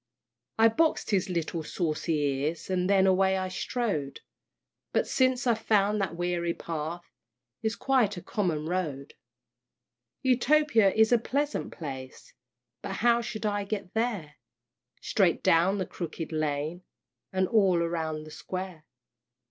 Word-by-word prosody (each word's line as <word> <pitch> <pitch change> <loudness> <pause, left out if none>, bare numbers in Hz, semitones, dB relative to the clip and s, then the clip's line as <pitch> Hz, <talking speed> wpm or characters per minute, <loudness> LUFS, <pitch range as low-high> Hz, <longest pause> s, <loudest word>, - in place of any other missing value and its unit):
I 225 0 +7
box'd 310 +3 +1
his 190 -2 +1
little 170 -1 -2
saucy 160 0 -2
ears, 145 +5 -1
And 180 0 +1
then 195 -1 +5
away 190 0 +3
I 185 0 -2
strode; 185 - -2 0.7
But - - +2
since 255 -1 +1
I've 235 -3 +2
found 210 -1 +2
that 180 -4 -2
weary 175 -1 -1
path 165 +1 -5 0.6
Is 220 0 -1
quite 245 -8 +2
a - - -5
common 170 -7 -1
road. 155 -6 -3 1.1
Utopia 260 -4 +4
is 220 +2 +4
a 240 - +5
pleasant 285 +5 -2
place, 130 -5 -8 0.5
But 195 - -5
how 235 +2 +3
shall 225 -2 -5
I 205 -1 0
get 200 -3 -5
there? 215 -10 -2 0.6
"Straight - - +2
down 175 +5 +4
the 190 - -1
Crooked 165 -1 -6
Lane, 155 +2 -2 0.5
And 190 0 +1
all 195 -5 +4
round 160 -2 -2
the 155 - -11
Square." 185 -2 -6
185 Hz, 135 wpm, -28 LUFS, 165-220 Hz, 1.1 s, I